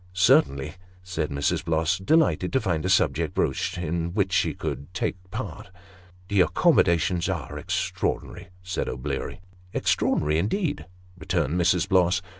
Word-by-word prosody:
" 90 Hz, -, -26 dB, 0.2 s
Certainly," 70 Hz, +2 st, +3 dB, 0.3 s
said 85 Hz, -4 st, -3 dB
Mrs. 70 Hz, 0 st, -1 dB
Bloss, 80 Hz, +3 st, +1 dB
delighted 95 Hz, -, +2 dB
to 135 Hz, -, +4 dB
find 85 Hz, -9 st, -1 dB
a 95 Hz, -, -1 dB
subject 95 Hz, -, +2 dB
broached -, -, 0 dB
in 85 Hz, +1 st, -2 dB
which 95 Hz, -3 st, +1 dB
she -, -, +1 dB
could 70 Hz, +5 st, -5 dB
take -, -, -1 dB
part. 90 Hz, -, -6 dB, 0.3 s
" 90 Hz, 0 st, -26 dB
The 100 Hz, -1 st, +3 dB
accommodations 85 Hz, -1 st, +3 dB
are -, -, -4 dB
extraordinary," -, -, -3 dB, 0.2 s
said 95 Hz, 0 st, -3 dB
O'Bleary. 65 Hz, -, -4 dB, 0.2 s
" 90 Hz, 0 st, -27 dB
Extraordinary 75 Hz, +1 st, +1 dB
indeed," 145 Hz, -, -1 dB, 0.3 s
returned 85 Hz, -4 st, -1 dB
Mrs. 90 Hz, +1 st, +2 dB
Bloss. 95 Hz, -1 st, +3 dB
90 Hz, 145 wpm, -25 LUFS, 80-95 Hz, 0.3 s, to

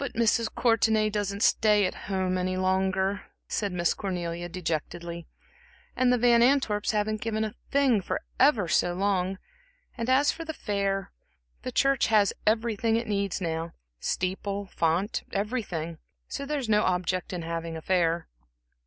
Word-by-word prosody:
"But 280 Hz, -, -4 dB
Mrs. 230 Hz, 0 st, +2 dB
Courtenay 220 Hz, -2 st, +3 dB
doesn't 205 Hz, 0 st, -1 dB
stay 210 Hz, -2 st, +4 dB
at 185 Hz, -, -1 dB, 0.2 s
home 185 Hz, -1 st, 0 dB
any 185 Hz, 0 st, -1 dB
longer," 190 Hz, +1 st, +1 dB, 0.3 s
said 205 Hz, -2 st, -1 dB
Miss 175 Hz, -1 st, +1 dB
Cornelia, 175 Hz, -3 st, -4 dB
dejectedly, 170 Hz, 0 st, -4 dB, 0.7 s
"and 255 Hz, -1 st, +3 dB
the 250 Hz, -, +4 dB
Van 235 Hz, 0 st, +5 dB
Antwerps 240 Hz, -5 st, +2 dB
haven't 215 Hz, 0 st, 0 dB
given 220 Hz, -1 st, -1 dB
a 215 Hz, -1 st, -3 dB, 0.2 s
thing 270 Hz, -7 st, +3 dB
for -, -, -2 dB, 0.2 s
ever 250 Hz, -, +4 dB
so 175 Hz, +2 st, +2 dB
long, 190 Hz, -1 st, 0 dB, 0.6 s
and 235 Hz, 0 st, -3 dB
as 270 Hz, +3 st, +4 dB
for 330 Hz, -, -7 dB
the 320 Hz, -1 st, -6 dB
fair 195 Hz, -2 st, -2 dB, 0.5 s
the 255 Hz, -, -5 dB
church 275 Hz, +1 st, +3 dB
has 210 Hz, -3 st, +4 dB
everything 225 Hz, 0 st, +2 dB
it 230 Hz, +1 st, 0 dB
needs 200 Hz, -3 st, -1 dB
now 165 Hz, -2 st, -3 dB, 0.3 s
steeple, 195 Hz, +2 st, -2 dB
font, 170 Hz, +6 st, +1 dB
everything, 195 Hz, -7 st, -3 dB, 0.3 s
so 280 Hz, -, -5 dB
there 300 Hz, +1 st, -1 dB
is 265 Hz, -4 st, -3 dB
no 210 Hz, -1 st, +4 dB
object 180 Hz, -1 st, 0 dB
in 180 Hz, -2 st, -4 dB
having 165 Hz, 0 st, -4 dB
a -, -, -7 dB
fair." 170 Hz, -2 st, +1 dB
200 Hz, 155 wpm, -27 LUFS, 180-225 Hz, 0.7 s, Van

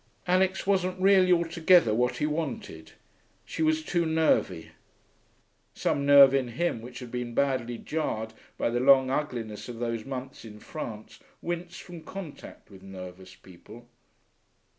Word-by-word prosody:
Alix 185 Hz, +1 st, +1 dB
wasn't 185 Hz, -2 st, 0 dB
really 190 Hz, -1 st, +5 dB
altogether 170 Hz, -5 st, +4 dB
what 125 Hz, +2 st, +1 dB
he 150 Hz, -, 0 dB
wanted. 135 Hz, -, -4 dB, 0.5 s
She -, -, -6 dB
was 155 Hz, 0 st, +2 dB
too 170 Hz, +2 st, 0 dB
nervy. 160 Hz, -, +1 dB, 1.0 s
Some 140 Hz, 0 st, -1 dB
nerve 140 Hz, -1 st, +8 dB
in 135 Hz, -2 st, +1 dB
him 120 Hz, 0 st, -2 dB
which 120 Hz, +1 st, -10 dB
had 120 Hz, -2 st, -9 dB
been 125 Hz, -1 st, -4 dB
badly 130 Hz, -4 st, 0 dB
jarred 110 Hz, -7 st, -3 dB, 0.2 s
by -, -, 0 dB
the 120 Hz, -, 0 dB
long 130 Hz, 0 st, +5 dB
ugliness 120 Hz, -7 st, -4 dB
of 120 Hz, -, -7 dB
those 115 Hz, -1 st, -3 dB
months 130 Hz, 0 st, -7 dB
in 105 Hz, -2 st, -11 dB
France 110 Hz, -5 st, -8 dB, 0.2 s
winced 175 Hz, 0 st, -5 dB
from 175 Hz, -2 st, -10 dB
contact 170 Hz, -, -10 dB
with 95 Hz, -1 st, -14 dB
nervous 95 Hz, -1 st, -10 dB
people. 95 Hz, +6 st, -15 dB
135 Hz, 140 wpm, -27 LUFS, 115-165 Hz, 1.0 s, nerve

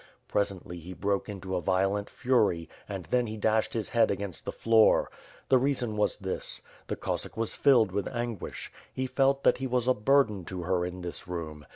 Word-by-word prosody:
Pres 100 Hz, -1 st, +1 dB
ently, 85 Hz, -2 st, -9 dB
he 90 Hz, +3 st, -8 dB
broke 100 Hz, +2 st, -1 dB
into 95 Hz, -2 st, -4 dB
a 90 Hz, -, 0 dB
violent 95 Hz, +3 st, +1 dB
fury, 110 Hz, -, +1 dB, 0.2 s
and 95 Hz, -4 st, -5 dB
then 125 Hz, -1 st, +2 dB
he 110 Hz, 0 st, -5 dB
dashed 110 Hz, +2 st, +1 dB
his 110 Hz, -3 st, -2 dB
head 115 Hz, -2 st, +3 dB
against 100 Hz, -2 st, -3 dB
the -, -, -2 dB
floor. 115 Hz, -1 st, +4 dB, 0.4 s
The 130 Hz, -, +6 dB
reason 125 Hz, -4 st, 0 dB
was 105 Hz, 0 st, +1 dB
this: 95 Hz, -2 st, -2 dB, 0.2 s
The -, -, -2 dB
Cossack -, -, -4 dB
was 115 Hz, -1 st, -2 dB
filled 120 Hz, -8 st, +4 dB
with 100 Hz, +1 st, -1 dB
anguish; 120 Hz, -5 st, -5 dB, 0.2 s
he 130 Hz, -, -2 dB
felt 135 Hz, +1 st, +2 dB
that -, -, +4 dB
he 130 Hz, -, -2 dB
was 125 Hz, -1 st, 0 dB
a 130 Hz, -, +5 dB
burden 110 Hz, -4 st, +2 dB
to 90 Hz, 0 st, -5 dB
her 90 Hz, +1 st, +1 dB
in 90 Hz, +1 st, -5 dB
this 85 Hz, 0 st, -6 dB
room. 80 Hz, -4 st, -6 dB
105 Hz, 200 wpm, -29 LUFS, 95-120 Hz, 0.4 s, The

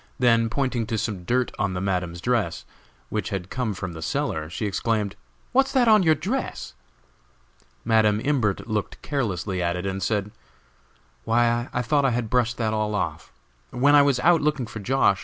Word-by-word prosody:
Then, 115 Hz, -3 st, +3 dB
pointing 125 Hz, -3 st, -1 dB
to 110 Hz, -, -1 dB
some 100 Hz, -4 st, -3 dB
dirt 125 Hz, +4 st, +1 dB
on 95 Hz, -2 st, 0 dB
the -, -, -2 dB
Madam's 90 Hz, -3 st, -2 dB
dress 115 Hz, -8 st, -1 dB, 0.4 s
which -, -, -2 dB
had 95 Hz, -2 st, -5 dB
come 120 Hz, -5 st, -2 dB
from 90 Hz, -2 st, -5 dB
the 80 Hz, -, -8 dB
cellar 80 Hz, 0 st, -2 dB
she 100 Hz, +5 st, -4 dB
exclaimed: 105 Hz, 0 st, -1 dB, 0.4 s
"What's 270 Hz, +1 st, +3 dB
that 255 Hz, -3 st, +4 dB
on 215 Hz, -2 st, +6 dB
your 160 Hz, -3 st, +4 dB
dress?" 205 Hz, -, -3 dB, 1.1 s
Madam 110 Hz, -2 st, +3 dB
Imbert 115 Hz, -7 st, 0 dB
looked 110 Hz, -2 st, -3 dB
carelessly 100 Hz, -, -2 dB
at 85 Hz, 0 st, 0 dB
it, 90 Hz, +1 st, -4 dB
and 95 Hz, 0 st, -3 dB
said: 105 Hz, -1 st, -1 dB, 0.9 s
"Why, 120 Hz, +1 st, +1 dB
I 125 Hz, -, -1 dB
thought 140 Hz, +4 st, +2 dB
I -, -, +4 dB
had 115 Hz, -2 st, -2 dB
brushed 120 Hz, -1 st, +1 dB
that 110 Hz, -2 st, 0 dB
all 105 Hz, -1 st, -1 dB
off! 105 Hz, -, -3 dB, 0.4 s
When 140 Hz, +4 st, +3 dB
I 145 Hz, -, +8 dB
was 140 Hz, -3 st, +2 dB
out 170 Hz, +4 st, +4 dB
looking 150 Hz, -4 st, 0 dB
for 110 Hz, -, -8 dB
Josh. 105 Hz, -3 st, +2 dB
115 Hz, 180 wpm, -24 LUFS, 100-130 Hz, 1.1 s, I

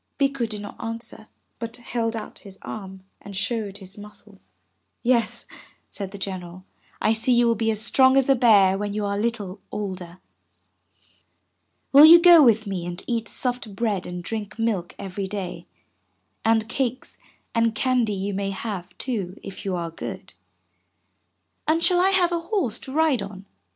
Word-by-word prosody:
'' -, -, -49 dB
Bikku 275 Hz, -4 st, 0 dB
did 210 Hz, -1 st, -5 dB
not 205 Hz, -, -9 dB
answer, 225 Hz, -1 st, -5 dB, 0.3 s
but 230 Hz, 0 st, -5 dB
held 230 Hz, -1 st, -2 dB
out 215 Hz, -1 st, -7 dB
his 195 Hz, -2 st, -12 dB
arm 190 Hz, -3 st, -8 dB, 0.2 s
and 200 Hz, -1 st, -7 dB
showed 205 Hz, -2 st, -2 dB
his 195 Hz, +1 st, -11 dB
muscles. 210 Hz, -1 st, -15 dB, 0.5 s
"Yes," 235 Hz, -3 st, +1 dB, 0.5 s
said 195 Hz, -2 st, -6 dB
the 200 Hz, -, -9 dB
General, 185 Hz, -2 st, -6 dB, 0.3 s
"I 215 Hz, -, +2 dB
see 225 Hz, +3 st, +1 dB
you 240 Hz, 0 st, +4 dB
will 235 Hz, -, +4 dB
be 225 Hz, 0 st, -1 dB
as 215 Hz, -1 st, 0 dB
strong 260 Hz, +2 st, +5 dB
as 270 Hz, -, +3 dB
a 275 Hz, -, +6 dB
bear 205 Hz, -6 st, +5 dB
when 205 Hz, 0 st, -3 dB
you 210 Hz, -1 st, -1 dB
are 200 Hz, 0 st, -1 dB
a 205 Hz, -, -1 dB
little 210 Hz, -4 st, -3 dB
older. 185 Hz, -4 st, -5 dB, 1.7 s
Will 280 Hz, +2 st, +9 dB
you 335 Hz, +2 st, +10 dB
go 345 Hz, -2 st, +8 dB
with 225 Hz, -5 st, +4 dB
me 185 Hz, -4 st, -4 dB
and 175 Hz, +1 st, -6 dB
eat 230 Hz, -2 st, -2 dB
soft 245 Hz, -5 st, -3 dB
bread 205 Hz, -4 st, -1 dB
and 180 Hz, 0 st, -6 dB
drink 215 Hz, +2 st, -5 dB
milk 215 Hz, -6 st, -1 dB
every 195 Hz, 0 st, -5 dB
day, 195 Hz, -2 st, -6 dB, 0.8 s
and 225 Hz, -1 st, +2 dB
cakes 255 Hz, +1 st, -3 dB, 0.3 s
and 230 Hz, -1 st, +1 dB
candy 250 Hz, -4 st, +1 dB
you 200 Hz, +1 st, -3 dB
may 195 Hz, 0 st, -2 dB
have, 190 Hz, -3 st, -6 dB
too, 205 Hz, -7 st, -3 dB
if 195 Hz, -, -9 dB
you 190 Hz, -2 st, -1 dB
are 170 Hz, -1 st, -4 dB
good?" 165 Hz, -, -7 dB, 1.3 s
"And 325 Hz, +2 st, +2 dB
shall 360 Hz, -1 st, +4 dB
I 380 Hz, -, +4 dB
have 365 Hz, -2 st, +3 dB
a 340 Hz, -, 0 dB
horse 335 Hz, -, -1 dB
to 265 Hz, -, -9 dB
ride 300 Hz, -5 st, +2 dB
on?" 195 Hz, -1 st, -8 dB
215 Hz, 175 wpm, -24 LUFS, 195-240 Hz, 1.7 s, you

